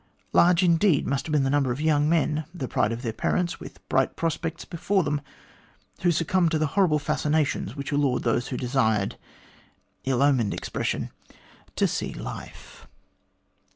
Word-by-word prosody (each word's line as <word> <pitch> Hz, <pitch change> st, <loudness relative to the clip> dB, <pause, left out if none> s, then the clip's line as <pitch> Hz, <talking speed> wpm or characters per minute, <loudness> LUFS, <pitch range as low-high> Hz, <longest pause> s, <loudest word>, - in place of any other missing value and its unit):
Large 175 Hz, +1 st, +5 dB
indeed 170 Hz, -2 st, +3 dB
must 140 Hz, +2 st, -1 dB
have -, -, -4 dB
been 150 Hz, -2 st, +3 dB
the 135 Hz, -, +1 dB
number 140 Hz, -3 st, +2 dB
of 120 Hz, -, -3 dB
young 150 Hz, -1 st, +2 dB
men, 155 Hz, -2 st, +1 dB
the 135 Hz, -7 st, -4 dB
pride 105 Hz, -, +1 dB
of 115 Hz, +2 st, -5 dB
their 115 Hz, -3 st, -2 dB
parents, 175 Hz, +9 st, -1 dB
with -, -, -12 dB
bright -, -, +1 dB
prospects 165 Hz, 0 st, -3 dB
before 190 Hz, +3 st, 0 dB
them, 145 Hz, -1 st, -1 dB, 0.8 s
who 175 Hz, -, +3 dB
succumbed 170 Hz, +1 st, +2 dB
to 160 Hz, -, +1 dB
the 155 Hz, -, +1 dB
horrible 185 Hz, -6 st, +3 dB
fascinations 150 Hz, -5 st, 0 dB
which 140 Hz, -1 st, -5 dB
allured 140 Hz, -3 st, +1 dB
those 120 Hz, +1 st, 0 dB
who 125 Hz, -, -4 dB
desired 110 Hz, -6 st, +1 dB, 0.9 s
ill 135 Hz, 0 st, +1 dB
omened 130 Hz, -7 st, +2 dB
expression -, -, -3 dB, 0.6 s
to -, -, +2 dB
see -, -, -3 dB
life." -, -, -9 dB
150 Hz, 160 wpm, -25 LUFS, 130-165 Hz, 0.9 s, Large